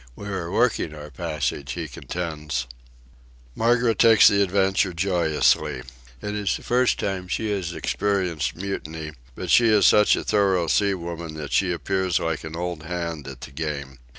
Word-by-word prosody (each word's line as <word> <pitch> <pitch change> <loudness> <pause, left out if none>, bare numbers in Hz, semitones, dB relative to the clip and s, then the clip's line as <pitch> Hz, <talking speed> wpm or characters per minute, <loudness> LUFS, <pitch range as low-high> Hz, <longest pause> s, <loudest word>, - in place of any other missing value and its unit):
We 100 - -8
are 90 -4 -3
working 105 -8 +1
our 75 0 -9
passage, 65 +1 -3
he 85 0 -4
contends. 75 -2 -4 0.9
Margaret 115 - +2
takes 115 -2 +7
the 100 0 +4
adventure 95 -1 +2
joyously. 85 -4 +1 0.4
It 105 - -3
is 105 -2 -1
the - - -14
first 125 +1 +2
time 95 -2 -3
she 110 +4 -2
has 95 -4 -2
experienced 90 -6 -1
mutiny, 80 -4 -5 0.2
but - - -4
she 120 - +6
is 105 -2 +4
such 105 0 +6
a - - -3
thorough 95 -4 +2
sea 100 +4 +2
woman 85 -2 -6
that 75 -2 -6
she 95 -2 +2
appears 95 +1 0
like 80 -2 -2
an 80 0 -7
old 85 -1 -4
hand 85 -3 -4
at 65 -2 -9
the - - -9
game. 70 -3 -5
90 Hz, 165 wpm, -24 LUFS, 80-100 Hz, 0.9 s, takes